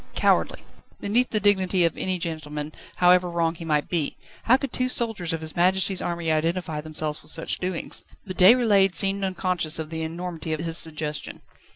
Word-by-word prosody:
cowardly! -, -, +1 dB, 0.4 s
beneath 235 Hz, +5 st, +1 dB
the 215 Hz, -, +1 dB
dignity 190 Hz, -3 st, +3 dB
of 165 Hz, -, 0 dB
any 185 Hz, -1 st, -2 dB
gentleman, 155 Hz, -3 st, -5 dB, 0.2 s
however 180 Hz, 0 st, +4 dB
wrong 170 Hz, -1 st, 0 dB
he 170 Hz, -, -10 dB
might 150 Hz, -2 st, 0 dB
be. 165 Hz, -5 st, -2 dB, 0.3 s
How 250 Hz, +3 st, +5 dB
could 275 Hz, -2 st, -5 dB
two 255 Hz, 0 st, 0 dB
soldiers 225 Hz, -9 st, 0 dB
of 165 Hz, -1 st, -3 dB
His 155 Hz, -1 st, -4 dB
Majesty's 185 Hz, +2 st, +3 dB
army 170 Hz, -2 st, -2 dB
identify 160 Hz, 0 st, -1 dB
themselves 155 Hz, -1 st, -3 dB
with 150 Hz, -, -12 dB
such 165 Hz, +1 st, -2 dB
doings? 180 Hz, -2 st, -4 dB, 0.2 s
But 185 Hz, -2 st, -6 dB
Déroulède 200 Hz, -2 st, +5 dB
seemed 195 Hz, 0 st, +2 dB
unconscious 180 Hz, -4 st, -1 dB
of 160 Hz, 0 st, -5 dB
the 160 Hz, 0 st, -4 dB
enormity 165 Hz, -1 st, -5 dB
of 155 Hz, -, -3 dB
his 165 Hz, 0 st, 0 dB
suggestion. 155 Hz, -1 st, -4 dB
175 Hz, 180 wpm, -24 LUFS, 160-190 Hz, 0.4 s, How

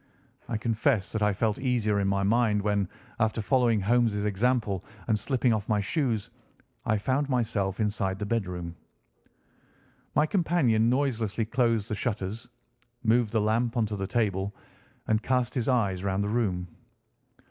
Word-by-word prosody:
I 115 Hz, -, -1 dB
confess 110 Hz, -, 0 dB
that 110 Hz, -, -2 dB
I 105 Hz, 0 st, +3 dB
felt 105 Hz, +2 st, 0 dB
easier 120 Hz, -6 st, +1 dB
in 100 Hz, -, +1 dB
my 100 Hz, 0 st, +1 dB
mind 110 Hz, 0 st, +3 dB
when, 100 Hz, -2 st, 0 dB, 0.3 s
after 110 Hz, 0 st, +1 dB
following 120 Hz, 0 st, +2 dB
Holmes' 105 Hz, -1 st, +2 dB
example 105 Hz, -2 st, 0 dB, 0.2 s
and 110 Hz, -1 st, +2 dB
slipping 125 Hz, +1 st, +1 dB
off 105 Hz, -1 st, -3 dB
my 105 Hz, -1 st, +2 dB
shoes, 115 Hz, -, -1 dB, 0.6 s
I 110 Hz, -, +3 dB
found 135 Hz, +7 st, 0 dB
myself 110 Hz, -6 st, 0 dB
inside 100 Hz, -3 st, 0 dB
the 105 Hz, -, -3 dB
bedroom. 90 Hz, -6 st, -3 dB, 1.4 s
My 150 Hz, -, +4 dB
companion 155 Hz, -, +2 dB
noiselessly 120 Hz, -5 st, 0 dB
closed 115 Hz, -2 st, +1 dB
the 110 Hz, -, -3 dB
shutters, 105 Hz, 0 st, -3 dB, 0.5 s
moved 115 Hz, -1 st, +3 dB
the 110 Hz, -, +2 dB
lamp 115 Hz, +3 st, +1 dB
onto 110 Hz, -2 st, 0 dB
the 95 Hz, -1 st, -3 dB
table, 100 Hz, -4 st, -1 dB, 0.5 s
and 110 Hz, 0 st, +1 dB
cast 125 Hz, -1 st, 0 dB
his 125 Hz, -2 st, -1 dB
eyes 100 Hz, -7 st, +1 dB
round 100 Hz, 0 st, 0 dB
the 100 Hz, -, -2 dB
room. 95 Hz, -7 st, 0 dB
110 Hz, 150 wpm, -28 LUFS, 100-120 Hz, 1.4 s, My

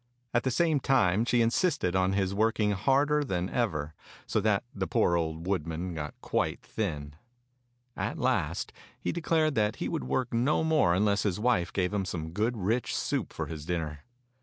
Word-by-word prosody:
At 120 Hz, -, +3 dB
the 130 Hz, -, 0 dB
same 160 Hz, +2 st, +2 dB
time 115 Hz, -6 st, +3 dB
she 120 Hz, 0 st, +3 dB
insisted 115 Hz, -, +1 dB
on 95 Hz, 0 st, +2 dB
his 95 Hz, -1 st, 0 dB
working 110 Hz, 0 st, +2 dB
harder 140 Hz, +8 st, +2 dB
than 95 Hz, -7 st, -2 dB
ever, 80 Hz, -11 st, -1 dB, 0.3 s
so -, -, 0 dB
that -, -, +2 dB
the -, -, -2 dB
poor 85 Hz, -, +2 dB
old 80 Hz, 0 st, -2 dB
woodman 90 Hz, -1 st, -2 dB
got 75 Hz, -2 st, -6 dB
quite -, -, -1 dB
thin. 75 Hz, -9 st, -4 dB, 0.8 s
At -, -, -3 dB
last -, -, 0 dB, 0.3 s
he -, -, -2 dB
declared 160 Hz, -2 st, +1 dB
that 105 Hz, -2 st, +1 dB
he -, -, -3 dB
would 65 Hz, -, -3 dB
work 120 Hz, -, -1 dB
no 125 Hz, +7 st, +2 dB
more 155 Hz, -, +3 dB
unless 100 Hz, +1 st, +2 dB
his 100 Hz, -2 st, -1 dB
wife 115 Hz, -6 st, +1 dB
gave 90 Hz, 0 st, 0 dB
him 100 Hz, -2 st, 0 dB
some 80 Hz, -4 st, -4 dB
good 110 Hz, +6 st, 0 dB
rich 110 Hz, +5 st, 0 dB
soup -, -, -1 dB
for -, -, -4 dB
his 80 Hz, -2 st, -7 dB
dinner. 80 Hz, -3 st, -3 dB
100 Hz, 180 wpm, -29 LUFS, 85-125 Hz, 0.8 s, At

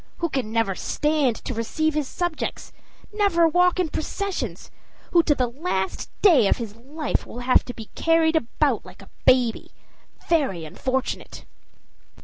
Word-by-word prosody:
who 340 Hz, -, -1 dB
can 260 Hz, -7 st, -2 dB
never 225 Hz, -3 st, +1 dB
stand 295 Hz, +3 st, 0 dB
to 255 Hz, -, -6 dB
receive 310 Hz, +8 st, -1 dB
his 300 Hz, -2 st, -1 dB
subjects, 350 Hz, 0 st, -3 dB, 0.4 s
never 395 Hz, -5 st, +3 dB
walk 360 Hz, +2 st, +3 dB
in 360 Hz, -, +2 dB
processions, 310 Hz, -, -4 dB, 0.4 s
who 345 Hz, -, +6 dB
to 300 Hz, -3 st, +2 dB
the 255 Hz, -, +1 dB
last 235 Hz, -, -3 dB
day 305 Hz, -, +6 dB
of -, -, +2 dB
his 225 Hz, -4 st, -6 dB
life 285 Hz, +5 st, -3 dB
will 245 Hz, -, -7 dB
have 255 Hz, +1 st, +4 dB
to -, -, -6 dB
be 225 Hz, -2 st, -9 dB
carried 330 Hz, 0 st, +3 dB
about 240 Hz, -7 st, +1 dB
like -, -, -13 dB
a -, -, -18 dB, 0.2 s
baby. 250 Hz, -3 st, +3 dB, 0.6 s
Very 265 Hz, -, +1 dB
unfortunate!" 260 Hz, +11 st, -3 dB
280 Hz, 150 wpm, -24 LUFS, 235-330 Hz, 0.6 s, who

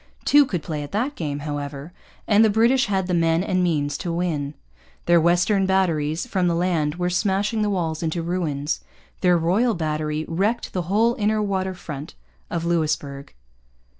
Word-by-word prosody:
Two 290 Hz, -1 st, +6 dB
could 180 Hz, -, -3 dB
play 150 Hz, -2 st, -4 dB
at 145 Hz, -, -7 dB
that 250 Hz, +8 st, 0 dB
game, 145 Hz, -, -4 dB
however, 145 Hz, +1 st, -5 dB, 0.3 s
and 210 Hz, +1 st, +5 dB
the 220 Hz, -, +5 dB
British 235 Hz, +4 st, +3 dB
had 190 Hz, -2 st, 0 dB
the 180 Hz, -, -2 dB
men 165 Hz, 0 st, +2 dB
and 185 Hz, -2 st, 0 dB
means 145 Hz, -4 st, 0 dB
to 175 Hz, -, -3 dB
win. 155 Hz, -4 st, -2 dB, 0.5 s
Their 170 Hz, -1 st, +5 dB
western 175 Hz, +4 st, +3 dB
batteries 165 Hz, -4 st, +1 dB
from 190 Hz, -7 st, 0 dB
the 170 Hz, -, +1 dB
land 165 Hz, -4 st, 0 dB
were 180 Hz, 0 st, -1 dB
smashing 205 Hz, +3 st, 0 dB
the 210 Hz, -, +1 dB
walls 165 Hz, -5 st, -1 dB
into 165 Hz, 0 st, -2 dB
ruins. 160 Hz, -4 st, -2 dB, 0.4 s
Their 180 Hz, -1 st, +4 dB
Royal 200 Hz, +9 st, +2 dB
Battery 155 Hz, -1 st, -2 dB
wrecked 200 Hz, +8 st, -1 dB
the 180 Hz, -, -1 dB
whole 225 Hz, +4 st, +3 dB
inner 215 Hz, +1 st, +1 dB
water 190 Hz, -2 st, -1 dB
front 150 Hz, -4 st, -8 dB, 0.3 s
of 170 Hz, -1 st, -3 dB
Louisbourg. 150 Hz, -4 st, -1 dB
175 Hz, 170 wpm, -23 LUFS, 155-195 Hz, 0.5 s, Two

